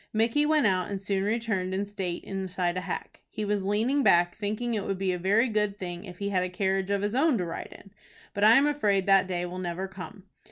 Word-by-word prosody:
Micky 230 +7 +2
went 305 -3 +3
out, 185 -3 +1
and 200 -1 -3
soon 195 0 -1
returned 205 -4 -1
in 200 +1 -1
state 190 -4 -4
inside 185 -2 -2
a 185 - -2
hack. - - -6
He 215 - -4
was 205 -1 0
leaning 225 +8 +1
back, 175 -7 +4
thinking 215 +3 -3
it 210 -3 -1
would 195 -1 -2
be 190 0 0
a 180 - -3
very 205 +7 +3
good 210 -3 0
thing 175 0 -6
if 180 -2 -10
he 200 +1 -3
had 190 -2 +1
a 185 - -2
carriage 190 +1 -1
of 200 0 0
his 205 +1 -1
own 275 0 +3
to 180 - -1
ride 165 - -6
in. 195 - -18 0.4
But 200 - -1
I 220 +2 +8
am 275 - +5
afraid 210 -10 +1
that 195 -1 +4
day 180 -1 -2
will 180 +1 -6
never 180 +1 -3
come. 190 +1 -10
195 Hz, 245 wpm, -27 LUFS, 185-215 Hz, 0.4 s, I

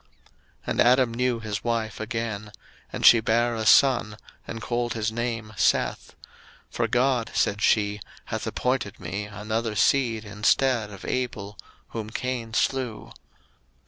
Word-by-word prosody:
01:004:025 - - -36 0.6
And - - +1
Adam 125 -1 +4
knew 125 0 0
his 105 -2 -4
wife 115 -2 -2
again; 110 -1 -4 0.4
and - - -2
she 115 - +9
bare 120 +2 +1
a 110 -1 -2
son, 120 -3 +4 0.3
and 115 - -5
called 120 +1 -2
his 110 0 -1
name 115 -2 -3
Seth: - - 0 0.6
For - - 0
God, 125 -2 +1
said 100 0 +1
she, 105 -1 +2 0.3
hath - - -4
appointed 125 -6 -2
me 100 +5 -4
another 110 +2 -3
seed 115 -2 +2
instead 105 +3 +1
of 100 -2 -10
Abel, 110 -5 -3 0.3
whom 110 -2 -5
Cain 120 -1 -4
slew. 130 -5 -1
115 Hz, 140 wpm, -25 LUFS, 105-120 Hz, 0.6 s, she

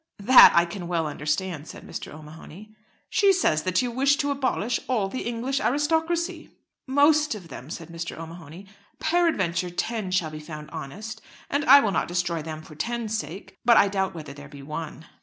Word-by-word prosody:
"That 250 +6 +8
I 170 - +5
can 175 0 -7
well 170 -2 0
understand," 150 +2 -3
said - - -11
Mr. - - -7
O'Mahony. 160 +7 -12 0.3
"She 400 -1 +4
says 255 - +2
that 185 +6 +1
you 245 - -2
wish 275 +4 +3
to 285 0 -1
abolish 255 -4 -1
all 225 -7 0
the 245 +4 -5
English 240 +3 -2
aristocracy." 320 +5 0 0.4
"Most 295 0 +3
of 180 -5 -11
them," 130 +1 -10
said 165 0 -7
Mr. 170 0 -6
O'Mahony. 165 +2 -10 0.3
"Peradventure 200 - +1
ten 215 +3 -3
shall 180 -4 0
be 155 - -7
found 150 -1 -9
honest, 215 +10 -7 0.3
and 285 +1 +1
I 280 0 +9
will 210 - 0
not - - 0
destroy 175 -2 -1
them 155 0 -7
for 155 - -13
ten's 225 +7 -3
sake; 190 -2 -7
but 235 0 +6
I 200 - +5
doubt 190 -2 -1
whether 150 -4 -8
there 140 0 -12
be 140 -1 -11
one." 155 +2 -7
190 Hz, 185 wpm, -25 LUFS, 160-255 Hz, 0.4 s, I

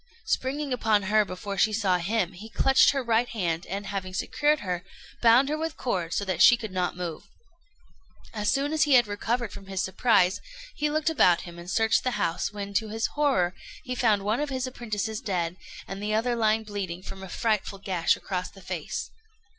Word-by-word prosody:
Springing 280 - -1
upon 220 -4 +2
her 215 +2 +3
before 200 0 -6
she 215 - +4
saw 200 -4 +1
him, 190 +1 0
he 210 +5 -10
clutched 270 +3 +4
her 275 -2 0
right 235 +1 +2
hand, 170 -7 -2
and, 200 +2 -4
having 190 -2 -4
secured 295 +7 +1
her, 180 -3 -3 0.4
bound 240 +3 +6
her 300 - 0
with 320 0 -3
cords 180 -9 -2
so 200 - -1
that 185 -3 -1
she 240 - +8
could 220 -4 -6
not 180 -1 -1
move. 170 -3 -4 1.1
As 210 -2 -1
soon 285 +2 0
as 315 - 0
he 290 -4 +5
had 240 -1 +6
recovered 225 +2 -2
from 195 - -11
his 190 -1 -2
surprise, 190 -1 +2 0.3
he 300 0 0
looked 310 +1 +1
about 180 - +4
him, 170 -1 -10
and 170 +1 -9
searched 225 +2 +2
the 255 -4 -1
house, 170 -3 -1
when, 200 -1 -6
to 220 +2 +1
his 225 +1 -1
horror, 265 -13 +2 0.3
he 250 - -4
found 220 -5 +2
one 215 +5 0
of 295 0 -1
his 260 -1 -2
apprentices 220 -3 -4
dead, 180 -7 -2 0.3
and 195 +1 -6
the 210 +1 -1
other 240 +2 +1
lying 220 -1 +2
bleeding 195 -4 -5
from 190 0 -8
a 190 - -8
frightful 210 -1 -1
gash 185 -4 +1
across 180 -2 -4
the 195 - -16
face. 175 -3 -4
210 Hz, 200 wpm, -27 LUFS, 185-240 Hz, 1.1 s, she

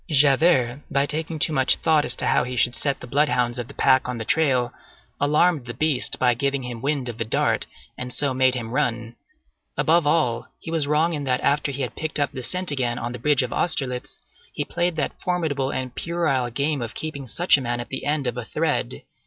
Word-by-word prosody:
Javert, 140 -2 +4
by 140 0 +1
taking 160 +2 -2
too 155 +1 +2
much 130 -2 +4
thought 155 -2 +2
as 125 - +6
to - - -3
how - - +2
he 125 +1 -5
should 120 +1 +3
set 140 -2 0
the - - -7
bloodhounds 125 -3 +1
of 120 - -4
the - - -13
pack 130 -1 +3
on 125 - -3
the 115 - -5
trail, 130 -4 +1 0.5
alarmed 150 -1 +2
the 120 - -6
beast 150 -1 +2
by 125 -1 +3
giving 140 +2 -1
him 120 -2 -6
wind 140 -1 -1
of 115 -2 -6
the - - +1
dart, 110 - 0 0.3
and 125 0 -4
so 140 0 0
made 130 0 +3
him 115 -2 -5
run. 120 -4 -2 0.6
Above 165 -1 +3
all, 125 -7 +1
he 165 - -8
was 160 -3 0
wrong 155 +3 +2
in 145 -2 -3
that 125 -1 +1
after 145 0 +1
he 140 0 -3
had 125 - -5
picked 155 -1 -3
up 145 - +1
the 130 - -6
scent 180 +7 0
again 125 -4 -1
on 120 0 -4
the 125 - -7
bridge 145 +1 +3
of 125 - -4
Austerlitz, 130 -7 -1 0.3
he - - -3
played 175 0 -1
that 155 - -2
formidable 155 -7 -1
and 130 -2 -4
puerile 155 -8 -1
game 140 +3 -1
of 115 -2 -6
keeping 140 -4 -5
such 175 +10 +4
a 140 - -1
man 120 -1 -2
at 120 - -6
the 135 - -4
end 145 -1 0
of 125 -1 -2
a 125 - -3
thread. 60 - -2
135 Hz, 225 wpm, -23 LUFS, 125-150 Hz, 0.6 s, as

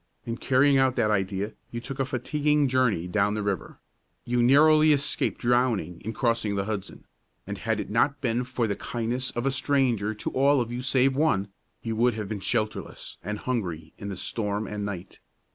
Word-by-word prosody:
In 115 0 -3
carrying 135 +2 +3
out 130 -1 +3
that 105 - +2
idea 100 +1 -1 0.2
you 120 - -5
took 135 +3 -7
a 135 - +2
fatiguing 145 +3 +1
journey 125 -9 +1
down 105 +2 +1
the 105 - -2
river; 100 -2 -3 0.5
you 120 0 +1
narrowly 155 +4 +6
escaped 140 0 0
drowning 120 -7 +1
in 110 - -3
crossing 115 -2 0
the 100 0 -1
Hudson; 105 -3 -5 0.4
and - - -6
had - - -1
it - - -5
not 140 0 +2
been 120 -2 0
for 125 -1 -2
the 100 -2 -1
kindness 120 +2 -2
of 120 +2 -2
a 135 - +2
stranger 125 -6 +1
to 105 - -4
all 140 +1 +3
of 120 -1 -2
you 120 +1 -3
save 130 0 +3
one, 120 -10 +1 0.3
you 115 -1 -2
would 120 +1 +2
have 105 -2 -4
been 105 0 -4
shelterless 110 +2 -3
and 105 0 -3
hungry 90 -11 -3
in 100 - -5
the 95 - -5
storm 105 +1 -2
and 105 0 -4
night. 95 -3 -7
120 Hz, 195 wpm, -26 LUFS, 105-130 Hz, 0.5 s, narrowly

